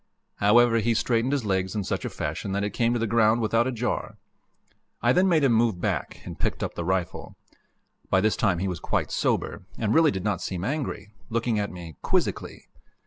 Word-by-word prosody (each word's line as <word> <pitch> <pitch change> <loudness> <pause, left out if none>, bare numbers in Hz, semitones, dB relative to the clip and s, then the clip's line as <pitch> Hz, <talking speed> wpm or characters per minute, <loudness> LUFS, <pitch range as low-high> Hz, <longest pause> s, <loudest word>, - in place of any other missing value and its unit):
However, 115 +3 +5
he 115 +1 +1
straightened 115 +2 +1
his 140 -5 0
legs 95 -1 -1
in 105 - -1
such - - -2
fashion 95 - -4
that 100 +1 0
it 100 - -1
came 115 -1 +1
to - - +1
the 115 - 0
ground 110 +1 +3
without 115 +2 +2
a - - 0
jar. 120 0 -3 0.8
I 120 +1 +3
then 190 +5 +4
made 160 -4 +3
him 130 -4 +4
move 115 -5 +2
back, - - -3
and - - -8
picked - - -1
up - - -3
the 85 - -4
rifle. 90 0 -2 0.7
By 95 - +4
this 110 +2 +2
time 100 -6 +1
he 95 +3 -1
was 90 -4 -3
quite - - -1
sober, - - -1 0.2
and 110 -2 0
really 160 -1 +5
did 95 -9 -3
not 105 -3 -1
seem 90 -2 -4
angry, 125 -6 -3 0.2
looking 115 -1 0
at 100 - -1
me 85 -3 -9
quizzically. - - -1
110 Hz, 205 wpm, -26 LUFS, 95-120 Hz, 0.8 s, However